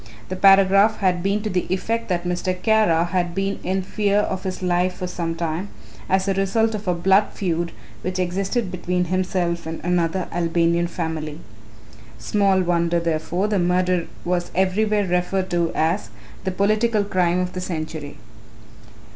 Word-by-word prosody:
The 185 - -3
paragraph 195 +2 +5
had 185 -3 +1
been 200 +3 0
to 215 - -2
the 180 -1 -1
effect 225 +5 -1
that 175 -1 0
Mr. 180 +1 -2
Kara 210 -6 +3
had 175 -1 -1
been 195 +1 -1
in 190 +1 -1
fear 205 +1 0
of 190 -2 0
his 185 0 -4
life 180 0 +1
for 180 - -4
some 170 -2 -3
time, 165 +3 -3 0.4
as 190 +1 +2
a 195 - +2
result 220 +4 +1
of 210 -2 -5
a 180 - +2
blood 190 +4 +4
feud 170 -3 -2 0.3
which 185 +1 -3
existed 190 +4 -1
between 180 0 -1
himself 180 -2 -1
and 165 0 -5
another 175 0 0
Albanian 170 0 +1
family. 160 -3 -4 0.8
Small 195 -2 +2
wonder, 170 -1 +1
therefore, 170 +4 -1
the 210 -2 +1
murder 180 0 +1 0.2
was 175 0 -1
everywhere 205 +3 +2
referred 185 +1 -1
to 170 -1 +1
as 160 -10 0 0.4
"the 190 - 0
political 215 +3 +2
crime 180 -3 +1
of 180 0 -2
the 185 - -4
century." 155 -4 -5
180 Hz, 160 wpm, -22 LUFS, 175-195 Hz, 0.8 s, paragraph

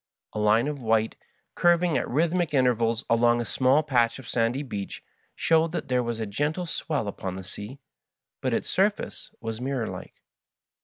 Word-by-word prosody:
A - - -3
line 105 +4 +4
of 145 -2 -4
white, 110 -1 +1 0.4
curving 175 -2 +3
at - - 0
rhythmic 165 +2 +1
intervals 115 -3 +2
along 120 +1 +4
a 120 - -1
small 130 +6 +3
patch 120 -6 +2
of 130 -3 -11
sandy 120 +4 0
beach, 100 -7 -6 0.3
showed 165 0 +2
that 170 - -3
there 125 -1 +2
was 120 -1 -3
a 110 - -1
gentle 145 - -1
swell 150 -8 -2
upon 95 -2 -4
the 95 - -6
sea, 105 +8 -8 0.6
but - - 0
its - - -1
surface - - 0
was 115 +1 -4
mirror 130 -3 -1
like. - - -7
125 Hz, 170 wpm, -26 LUFS, 115-150 Hz, 0.6 s, line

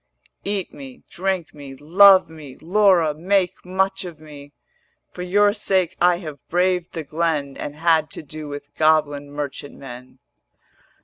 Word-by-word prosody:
470 200 0 0
Eat 185 - -9 0.2
me, - - -27
drink 185 -2 -2
me, 140 -2 -10
love 185 +6 +6
me; 155 -5 -12
Laura, 180 -3 +3
make 180 +3 0
much 190 +1 -1
of 170 -4 -9
me: 145 -2 -13 0.6
For 180 - -9
your 205 +3 +3
sake 190 -4 0
I 175 0 +4
have 155 -6 -8
braved 180 0 0
the 165 - -4
glen 155 -2 -2
And 145 - -6
had 160 -1 +2
to - - -7
do 155 +1 -8
with 145 0 -9
goblin 150 -2 +1
merchant 145 -1 -6
men.' 125 -1 -11
160 Hz, 150 wpm, -21 LUFS, 145-185 Hz, 0.6 s, love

